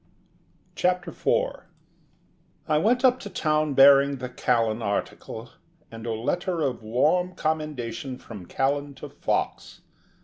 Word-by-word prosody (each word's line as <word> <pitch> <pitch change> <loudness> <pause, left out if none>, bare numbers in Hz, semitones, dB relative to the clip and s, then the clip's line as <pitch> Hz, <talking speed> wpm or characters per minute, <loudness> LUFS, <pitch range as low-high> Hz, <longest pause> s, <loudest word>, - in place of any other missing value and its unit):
CHAPTER 180 -1 0
FOUR - - -1 1.0
I 155 -1 +3
went 245 - +2
up 255 0 +4
to 205 - -7
town 155 -5 0
bearing 140 +1 +7
the 125 -1 -6
Callan 115 -3 0
article, 100 -2 -4 0.4
and 115 0 -8
a - - -1
letter 175 - -1
of 135 -6 -1
warm 155 +11 +1
commendation 140 -6 -3
from 105 -8 -10
Callan 140 +1 -1
to - - -9
Fox. - - -3
140 Hz, 125 wpm, -25 LUFS, 120-175 Hz, 1.0 s, bearing